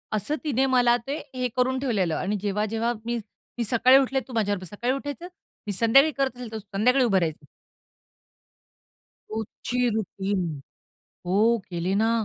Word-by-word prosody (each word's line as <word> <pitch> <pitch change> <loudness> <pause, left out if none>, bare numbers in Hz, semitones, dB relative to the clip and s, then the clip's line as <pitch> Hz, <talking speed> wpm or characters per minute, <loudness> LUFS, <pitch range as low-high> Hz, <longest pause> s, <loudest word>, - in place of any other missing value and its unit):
असं 250 +9 -1
तिने 270 -3 +1
मला 245 -2 +4
ते 285 +3 -2 0.2
हे 250 0 0
करून 260 +1 +2
ठेवलेलं 200 - 0
आणि 200 +3 -1
जेव्हा 210 +1 0
जेव्हा 225 +2 -1
मी, 235 0 -1 0.4
मी 235 - 0
सकाळी 250 +4 +5
उठले 270 0 +2
तू 255 - -10
माझ्याबरोबर 205 -4 0
सकाळी 245 +5 0
उठायचं. 285 +5 -5 0.4
मी 205 - -1
संध्याकाळी 255 +9 +5
करत 270 -2 0
असेल 240 -3 -7
तर 220 - -4
संध्याकाळी 220 +6 +2
उभं 195 -5 +3
राहायचं. 160 -3 -3 1.9
रोजची 225 +3 -4 0.2
रुटीन. 200 -2 -2 0.9
हो 185 - +1 0.3
केली 175 +2 -1
ना. 225 - +3
230 Hz, 150 wpm, -25 LUFS, 205-260 Hz, 1.9 s, सकाळी